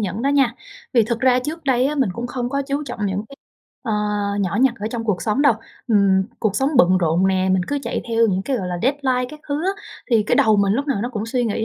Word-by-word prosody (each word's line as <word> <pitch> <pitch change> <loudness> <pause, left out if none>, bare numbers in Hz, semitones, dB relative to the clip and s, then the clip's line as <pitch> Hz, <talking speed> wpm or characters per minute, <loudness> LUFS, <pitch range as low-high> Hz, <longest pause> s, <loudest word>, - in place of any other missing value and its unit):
nhẫn 205 +3 -3
đó 275 - +1
nha. 275 -4 +2 0.4
Vì 235 - +5
thực 235 +1 -2
ra 255 -1 +4
trước 310 +5 -5
đây 260 -1 +2
á 295 - -1
mình 265 -9 +1
cũng 240 +4 -5
không 245 -1 -3
có 280 +1 -1
chú 280 +1 -2
trọng 230 -6 -4
những 195 +2 -2
cái, 275 - -13 0.5
ờ, 230 -5 -2 0.5
nhỏ 190 -1 -1
nhặt 260 -3 +4
ở 210 - -2
trong 230 -1 -4
cuộc 210 -5 -1
sống 220 +6 +1
đâu. 285 -3 +6 0.4
Ừm, 200 -3 +4 0.2
cuộc 210 -3 0
sống 270 +4 +2
bận 185 -5 +5
rộn 170 +2 +2
nè, 190 0 +1
mình 185 -1 +2
cứ 285 - 0
chạy - - -3
theo 230 0 +3
những 190 -2 0
cái, 265 +5 -1
gọi 190 -6 -3
là, 175 -1 -3
deadline 260 -1 +1
các 305 - -11
thứ 285 - -1
á, 390 - +2 0.4
thì 225 -2 +4
cái - - +1
đầu 220 -1 +4
mình 200 -1 +2
lúc 280 +6 -1
nào 265 -8 0
nó 240 - -2
cũng 220 -3 -4
suy 245 +1 0
nghĩ 220 0 -1
235 Hz, 275 wpm, -21 LUFS, 200-270 Hz, 0.5 s, đâu